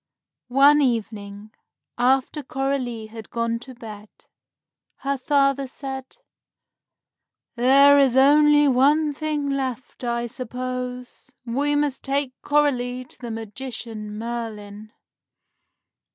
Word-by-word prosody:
One 280 +4 +5
evening, 215 -4 -3 0.4
after 265 +4 +1
Coralie 270 -4 -3
had 220 0 -10
gone 230 0 -1
to 255 +1 -12
bed, 215 -3 -10 0.9
her 275 +1 -1
father 275 -1 +1
said, 265 0 -8 1.4
"There 275 +4 +6
is 265 -2 +3
only 295 +2 +6
one 290 +4 +3
thing 300 -1 -2
left, 260 -2 -4
I 235 0 -1
suppose. 250 +1 -6 0.2
We 285 +5 0
must 290 -2 0
take 275 -1 -1
Coralie 255 -4 0
to - - -15
the 240 - -6
magician, 225 -1 -6
Merlin." 215 -2 -6
255 Hz, 100 wpm, -23 LUFS, 230-275 Hz, 1.4 s, There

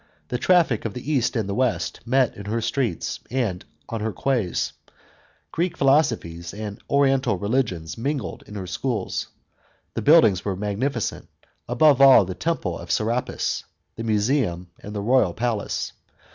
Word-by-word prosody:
The 125 - -2
traffic 170 - +3
of 110 - -3
the 125 +4 -4
East 125 -3 +1
and 110 -4 0
the 100 - -2
West 125 +2 0
met 130 -1 +2
in 100 - -9
her 110 +3 -1
streets 115 - -2
and 115 -8 -1 0.2
on 115 -2 -4
her 110 +1 -1
quays; 115 -2 -1 0.8
Greek 170 +1 -1
philosophies 115 - +1
and 105 +1 -6
oriental 135 -6 +3
religions 100 - -1
mingled 135 -3 -3
in 105 - -10
her 95 -2 -4
schools. 110 +2 -2 0.7
The - - -2
buildings 140 - +5
were 100 -2 -2
magnificent, 105 +5 -2 0.4
above 135 +3 +4
all, 135 -7 +8
the 95 - -4
Temple 165 - -2
of - - -10
Serapis, 115 +3 -1 0.3
the 115 - -5
Museum, 105 -5 0
and 105 +1 -9
the 100 - -2
Royal 115 -6 +3
Palace. 115 -3 -2
115 Hz, 150 wpm, -24 LUFS, 100-135 Hz, 0.8 s, all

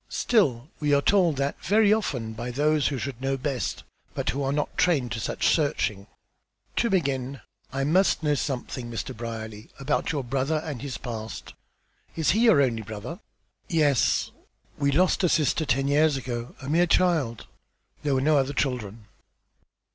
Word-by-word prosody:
"Still 145 - +1
we 150 -1 +2
are 140 - +3
told 180 -6 +3
that 140 +1 -2
very 210 +2 +4
often 125 - -2
by 120 +3 -5
those 150 +3 +2
who 140 - -2
should 130 -1 -5
know 135 0 0
best, 135 -1 -3 0.3
but - - -1
who 140 - -4
were 135 -1 0
not 150 +1 -2
trained 140 -9 +2
to 110 - -3
such - - -2
searching. 105 -10 0 0.7
To 235 - +2
begin, 135 - -1 0.3
I 135 +1 -1
must 175 +4 +2
know 150 -1 +2
something, 130 -3 -3
Mr. 115 - -5
Brierly, 110 -2 -7
about 145 +7 0
your 145 -4 -2
brother 135 +5 0
and 145 -7 -5
his 140 -2 -5
past. 110 -3 -7 0.6
Is 160 -2 +2
he 225 +5 +3
your 150 -12 +6
only 115 -4 0
brother?" 110 - -7 0.5
"Yes. 150 -7 +2 0.4
We 140 -1 +1
lost 185 +5 +2
a 180 - +4
sister 155 0 +1
ten 135 +2 +1
years 150 0 +3
ago, 120 -2 -5
a 130 - -8
mere 170 +4 +3
child. 160 -11 +1 0.6
There 145 -2 0
were 130 - +1
no 150 +1 +4
other 135 +1 -1
children." 115 -6 -2
140 Hz, 170 wpm, -26 LUFS, 125-155 Hz, 0.7 s, your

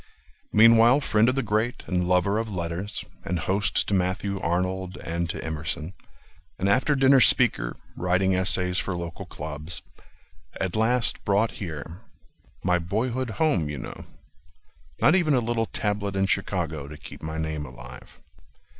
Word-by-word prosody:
Meanwhile 115 +4 +6
friend 110 -3 +3
of 130 - 0
the 135 - 0
great, 110 +3 -1
and 90 -1 -1
lover 90 +3 +2
of 115 0 -3
letters, 85 +2 -4 0.2
And 90 - -2
host 95 +5 +1
to - - -1
Matthew 95 +1 0
Arnold 95 +2 -2
and 85 +1 -3
to - - -4
Emerson. 80 +2 -3 0.6
An 95 - -1
after 130 +8 +3
dinner 135 0 +5
speaker, - - +4 0.2
writing 90 +2 +1
essays 90 0 +1
For 95 -3 -3
local 85 -1 -6
clubs. 75 +2 -6 0.8
At 95 -2 -2
last 115 +2 +1
brought 105 +2 +2
here— 85 0 -7 0.6
My 90 -1 +2
boyhood 115 +8 -2
home, 150 - +1
you 75 - -4
know— 60 - -8 0.9
Not 155 - +5
even 170 -6 +3
a - - +4
little 115 -1 -1
tablet 100 -1 -2
in 95 0 +2
Chicago 85 -7 -1
To 75 +1 -9
keep - - -11
my 80 +1 -5
name 80 -1 -3
alive. 65 0 -12
95 Hz, 150 wpm, -25 LUFS, 85-110 Hz, 0.9 s, Meanwhile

